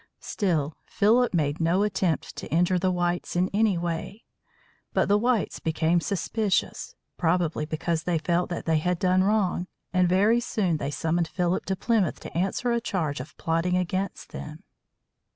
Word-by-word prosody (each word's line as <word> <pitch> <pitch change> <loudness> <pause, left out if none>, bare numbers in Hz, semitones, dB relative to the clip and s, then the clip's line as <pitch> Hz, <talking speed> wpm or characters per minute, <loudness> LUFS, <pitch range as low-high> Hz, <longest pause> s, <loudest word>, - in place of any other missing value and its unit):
Still, 160 -7 -1
Philip 235 +4 +3
made 155 -3 0
no 175 +5 +3
attempt 190 -5 -1
to - - -7
injure 180 +2 +3
the 185 +1 +1
whites 175 -1 -1
in 180 +2 +1
any 205 -3 +3
way. 170 +5 -4 0.7
But - - +2
the 205 - +4
whites 240 -2 0
became 160 +1 +1
suspicious, 200 +2 -1 0.2
probably 165 -3 +1
because 160 +1 -1
they 170 0 0
felt 175 +2 0
that 175 - -4
they 160 -1 +2
had 180 +3 0
done 185 +1 +3
wrong; 190 -3 +1 0.3
and 180 -1 +3
very 205 +6 +4
soon 195 -8 0
they 140 - -3
summoned 165 +3 0
Philip 180 +2 -1
to 190 - -1
Plymouth 205 -3 +1
to - - -9
answer 195 +7 0
a 235 0 +1
charge 160 - -2
of 130 - -9
plotting 165 +2 0
against 185 +2 -3
them. 150 +1 -8
180 Hz, 165 wpm, -26 LUFS, 165-195 Hz, 0.7 s, the